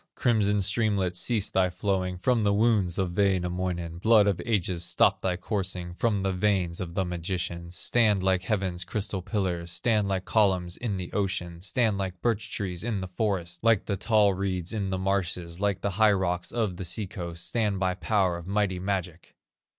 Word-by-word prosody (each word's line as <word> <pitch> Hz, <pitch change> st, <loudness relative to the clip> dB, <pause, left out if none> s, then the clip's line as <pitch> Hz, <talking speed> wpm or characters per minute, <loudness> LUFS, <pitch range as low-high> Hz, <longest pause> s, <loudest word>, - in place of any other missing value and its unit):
"Crimson 105 Hz, -4 st, +2 dB
streamlet, 100 Hz, -3 st, +1 dB
cease 105 Hz, +2 st, 0 dB
thy 95 Hz, -1 st, +3 dB
flowing 90 Hz, 0 st, -1 dB
From 115 Hz, +4 st, +1 dB
the 100 Hz, -1 st, +2 dB
wounds 105 Hz, -5 st, +2 dB
of 90 Hz, -2 st, -1 dB
Wainamoinen; 90 Hz, -3 st, 0 dB
Blood 110 Hz, +1 st, +5 dB
of 100 Hz, -3 st, 0 dB
ages, 90 Hz, -6 st, 0 dB
stop -, -, +2 dB
thy 90 Hz, -1 st, 0 dB
coursing 90 Hz, -3 st, -3 dB
From 100 Hz, +1 st, 0 dB
the 95 Hz, -1 st, 0 dB
veins 90 Hz, -3 st, 0 dB
of 85 Hz, -1 st, -6 dB
the 95 Hz, -1 st, +1 dB
magician; 85 Hz, -1 st, -3 dB
Stand 105 Hz, +2 st, +2 dB
like 95 Hz, -1 st, +2 dB
heaven's 95 Hz, -2 st, -1 dB
crystal 100 Hz, +1 st, -3 dB
pillars, 90 Hz, -4 st, -2 dB
Stand 105 Hz, +2 st, +1 dB
like 95 Hz, -1 st, -1 dB
columns 95 Hz, -5 st, +2 dB
in 110 Hz, -5 st, -3 dB
the 90 Hz, -2 st, -6 dB
ocean, 90 Hz, -4 st, -2 dB
Stand 100 Hz, +2 st, +1 dB
like 95 Hz, -2 st, -3 dB
birch 115 Hz, -3 st, -1 dB
trees 90 Hz, -3 st, -3 dB
in 110 Hz, -3 st, -1 dB
the 95 Hz, -, -5 dB
forest, 95 Hz, -2 st, -2 dB
Like 115 Hz, -3 st, +3 dB
the 100 Hz, -, -1 dB
tall 105 Hz, 0 st, +3 dB
reeds 95 Hz, -1 st, -3 dB
in 100 Hz, -3 st, -2 dB
the 95 Hz, -, -1 dB
marshes, 90 Hz, -3 st, -1 dB
Like 100 Hz, -1 st, 0 dB
the 100 Hz, -, -1 dB
high 105 Hz, +1 st, +4 dB
rocks 90 Hz, -2 st, -1 dB
on 110 Hz, -7 st, -1 dB
the 95 Hz, -, -4 dB
sea 95 Hz, +5 st, -2 dB
coast, 85 Hz, -2 st, -6 dB
Stand 105 Hz, -5 st, 0 dB
by 95 Hz, -1 st, +1 dB
power 95 Hz, -2 st, +1 dB
of 85 Hz, +1 st, -10 dB
mighty 100 Hz, -2 st, 0 dB
magic! 90 Hz, -3 st, -4 dB
95 Hz, 185 wpm, -27 LUFS, 90-105 Hz, -, Blood